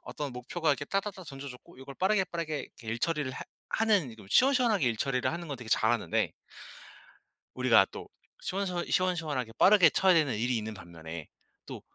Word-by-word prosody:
어떤 145 -2 -5
목표가 150 +7 -3
이렇게 145 0 +1
따다다 195 +2 -3
던져졌고 135 -3 -10
요걸 135 +1 -10
빠르게, 195 +1 +2
빠르게 165 -4 -4
일 115 +1 -4
처리를 150 -2 -1
하 - - -7 0.3
하는 205 - +2
이걸 110 -3 -13
시원시원하게 245 - +4
일 115 -2 +1
처리를 130 -2 0
하는 170 -1 -6
건 140 - -4
되게 120 -2 -10
잘하는데 - - +1 1.2
우리가 - - +5
또 - - -8 0.3
시원시원 180 -2 -2
시원시원하게 160 -10 0
빠르게 190 -4 +7
쳐야 190 +4 +4
되는 155 -8 +2
일이 120 +2 0
있는 110 0 -4
반면에 80 -3 -9 0.4
또 - - -8
145 Hz, 400 characters per minute, -29 LUFS, 125-185 Hz, 1.2 s, 빠르게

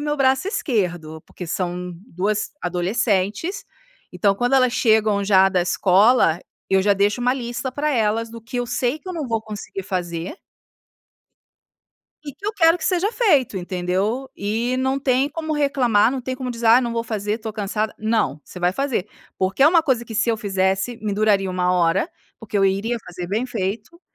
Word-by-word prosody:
o - - -4
meu 295 0 -1
braço 265 +6 +2
esquerdo. 175 - -2
Por - - -23
que 180 - -6
são 180 +1 -3
duas 210 0 -2
adolescentes, 200 - -1 0.5
então 200 -2 +2
quando 245 +6 +1
elas 255 -2 +3
chegam 220 -4 +3
já 195 -1 +5
da 185 -2 +1
escola, 185 0 +3 0.3
eu 190 0 +3
já 205 +1 +4
deixo 205 +4 +1
uma 250 +1 +2
lista 245 0 -4
pra 295 +3 -1
elas 225 0 +1
do 230 0 -10
que 235 +2 -7
eu 245 - -1
sei 245 +4 -1
que 370 - -12
eu 370 - -3
não 310 -6 -4
vou 225 -1 0
conseguir 210 -3 -7
fazer 175 - -4 1.9
e 285 - -6
que 400 - -10
eu 425 - 0
quero 335 -4 +4
que 315 - -6
seja 370 +2 +1
feito, 290 - +2
entendeu? 190 +8 -2
E 225 +5 -1
não 265 +1 0
tem 265 0 +1
como 315 +1 -4
reclamar, 260 -7 +3
não 265 - -3
tem 255 +1 -4
como 255 -1 -4
dizer: 230 0 -3
"Ah, 230 +3 +7
não 235 -2 -2
vou 230 - -1
fazer 215 -1 -3
tô 220 -1 -6
cansada.". 215 +1 -2
"Não! 215 -8 0
Você 180 - -11
vai 175 +1 +2
fazer!", 245 -5 -2 0.3
porque 190 +5 -2
é - - +8
uma 335 -1 +4
coisa 260 -6 0
que 225 - -9
se 225 +3 +1
eu 225 - 0
fizesse 195 +2 0
me 210 -2 -1
duraria 200 -2 +2
1h, 180 0 +1 0.3
porque 215 -2 -5
eu 195 - +3
iria 200 +5 0
fazer 180 0 -7
bem 210 +7 -1
feito, 220 - -4
220 Hz, 190 wpm, -21 LUFS, 195-255 Hz, 1.9 s, é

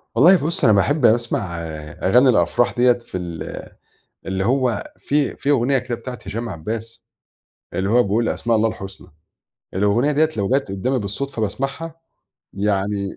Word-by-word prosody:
والله 165 +11 +7
بُصّ، 165 0 -2
أنا 110 -5 +6
باحب 135 +8 +2
أسمع 115 - +1 0.4
أغاني 125 +8 +5
الأفراح 115 +3 +2
ديَّة 125 0 +5
في 120 -5 -7
ال 85 -2 -6 0.6
اللي 95 0 -2
هو 125 -3 +1 0.2
في 145 -1 0
في 140 - -3
أغنية 135 -1 +3
كده 125 -1 -3
بتاعة 125 +1 -8
هشام 115 +4 -4
عباس 110 +6 -6 0.7
اللي 95 +1 -1
هو 120 +2 +4
بيقول 110 +4 0
أسماء 115 -1 0
الله 110 +1 +3
الحسنى، 95 -3 -9 0.7
الأغنية 105 +9 +2
ديَّة 155 +2 +3
لو 100 -2 0
جت 135 -2 +1
قدَّامي 110 +8 -1
بالصدفة 110 +4 -4
باسمعها، 135 +9 -3 0.6
يعني 100 0 -1
115 Hz, 150 wpm, -21 LUFS, 100-130 Hz, 0.7 s, والله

